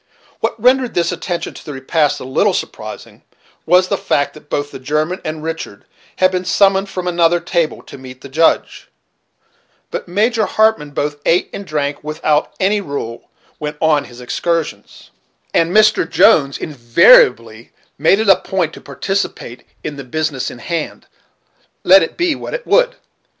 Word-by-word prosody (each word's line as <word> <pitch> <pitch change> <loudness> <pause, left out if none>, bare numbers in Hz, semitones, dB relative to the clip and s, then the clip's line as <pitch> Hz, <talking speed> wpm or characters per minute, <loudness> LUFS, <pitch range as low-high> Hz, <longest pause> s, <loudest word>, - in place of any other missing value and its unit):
What - - -2
rendered 250 +1 +2
this 170 0 +1
attention 175 0 -4
to - - -12
the 150 - -7
repast 145 +3 0
a - - -8
little 130 +1 +1
surprising, - - -7 0.5
was 180 +2 +4
the - - -1
fact 145 - 0
that 150 -1 -16
both 145 0 -2
the - - -9
German 155 +7 -2
and 155 0 -5
Richard 160 -10 -6 0.3
had 185 0 +3
been 185 -1 -2
summoned 195 +1 +2
from 185 -2 -5
another 175 -1 +2
table 170 -2 -2
to - - -12
meet 130 0 -12
the - - -9
Judge; 160 +5 0 1.0
but - - -5
Major 215 +4 +1
Hartmann 220 -9 +2
both 145 +1 -3
ate 175 +2 +1
and 200 - -7
drank 145 -1 -2
without 155 0 0
any 200 +2 +1
rule, 140 - -6 0.3
when 150 0 -4
on 155 -3 +2
his 120 0 -13
excursions; 155 -4 -3 0.4
and 165 0 +2
Mr. 215 +2 +3
Jones 145 -11 +4
invariably 120 - +3 0.3
made 160 +6 +4
it 220 - 0
a 195 - +7
point 175 -5 -2
to - - -11
participate 195 -10 -4 0.2
in 150 -2 -5
the 140 - -7
business 145 0 -3
in - - -10
hand, 165 +5 -5 0.8
let 190 +2 +7
it 165 - -3
be 345 -2 +1
what - - -6
it - - -6
would. - - +3
165 Hz, 165 wpm, -17 LUFS, 145-190 Hz, 1.0 s, a